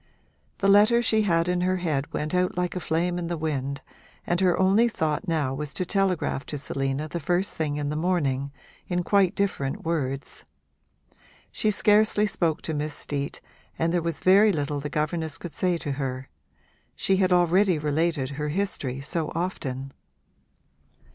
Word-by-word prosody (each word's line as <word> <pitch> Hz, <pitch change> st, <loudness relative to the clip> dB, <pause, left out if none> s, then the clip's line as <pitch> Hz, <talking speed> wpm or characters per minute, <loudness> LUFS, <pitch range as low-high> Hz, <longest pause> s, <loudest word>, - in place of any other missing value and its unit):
The 195 Hz, -, +1 dB
letter 215 Hz, +4 st, +5 dB
she 220 Hz, -2 st, +3 dB
had 170 Hz, -4 st, +2 dB
in 180 Hz, 0 st, +1 dB
her 185 Hz, +1 st, +1 dB
head 150 Hz, -6 st, -2 dB
went 155 Hz, +2 st, -3 dB
out 180 Hz, 0 st, +1 dB
like 180 Hz, 0 st, -1 dB
a -, -, -1 dB
flame 175 Hz, +1 st, -1 dB
in 170 Hz, -, -3 dB
the 170 Hz, 0 st, -2 dB
wind 140 Hz, -3 st, -3 dB, 0.4 s
and 175 Hz, +1 st, 0 dB
her 180 Hz, -2 st, +3 dB
only 195 Hz, +5 st, +4 dB
thought 160 Hz, -1 st, -2 dB
now 155 Hz, -6 st, 0 dB
was 145 Hz, 0 st, -5 dB
to 185 Hz, -, -1 dB
telegraph 185 Hz, -7 st, 0 dB
to 150 Hz, -, -4 dB
Selina 135 Hz, +1 st, -2 dB
the 170 Hz, -, -4 dB
first 175 Hz, +5 st, 0 dB
thing 150 Hz, -2 st, -1 dB
in 145 Hz, -1 st, -2 dB
the 150 Hz, -, -2 dB
morning, 145 Hz, -5 st, 0 dB, 0.4 s
in 180 Hz, 0 st, -1 dB
quite 195 Hz, -1 st, +3 dB
different 165 Hz, -9 st, -1 dB
words. 140 Hz, -5 st, -3 dB, 1.1 s
She 215 Hz, -, 0 dB
scarcely 210 Hz, 0 st, +4 dB
spoke 170 Hz, -6 st, -1 dB
to 160 Hz, -, -3 dB
Miss 150 Hz, 0 st, -3 dB
Steet 140 Hz, -1 st, -3 dB, 0.4 s
and 165 Hz, +1 st, 0 dB
there 175 Hz, -, +2 dB
was 165 Hz, -1 st, -3 dB
very 200 Hz, +3 st, +6 dB
little 145 Hz, -4 st, -2 dB
the 150 Hz, +1 st, -4 dB
governess 155 Hz, +1 st, -1 dB
could 175 Hz, -, -8 dB
say 180 Hz, -2 st, 0 dB
to 145 Hz, -, -4 dB
her: 135 Hz, -1 st, -4 dB, 0.7 s
she 195 Hz, -, +1 dB
had 185 Hz, -1 st, +2 dB
already 180 Hz, +1 st, +4 dB
related 150 Hz, -2 st, 0 dB
her 150 Hz, +1 st, -3 dB
history 145 Hz, -7 st, -2 dB
so 155 Hz, +2 st, -3 dB
often. 135 Hz, -7 st, -3 dB
165 Hz, 170 wpm, -26 LUFS, 145-185 Hz, 1.1 s, very